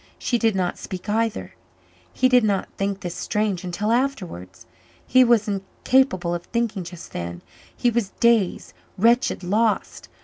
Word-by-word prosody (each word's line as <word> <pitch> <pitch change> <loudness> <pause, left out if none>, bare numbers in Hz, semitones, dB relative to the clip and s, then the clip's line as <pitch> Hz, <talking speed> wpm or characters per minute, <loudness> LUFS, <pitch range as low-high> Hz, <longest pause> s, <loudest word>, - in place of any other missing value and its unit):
She 240 - 0
did 225 -3 +2
not 180 -2 -1
speak 185 +1 -7
either. 225 +1 -1 0.6
He 255 - +2
did 250 -2 +4
not 200 -3 0
think 195 0 -2
this 175 -3 -4
strange 210 -4 -1
until 185 +5 -2
afterwards. 190 - -2 0.4
He 255 +1 +5
was 235 -3 +3
incapable 195 -1 +1
of 175 0 -4
thinking 230 -5 -2
just 170 0 -10
then; 85 0 -5 0.3
he 240 - +2
was 230 -4 0
dazed, 230 -6 +2 0.2
wretched, 230 0 +2
lost. 215 +4 0
210 Hz, 145 wpm, -23 LUFS, 180-235 Hz, 0.6 s, He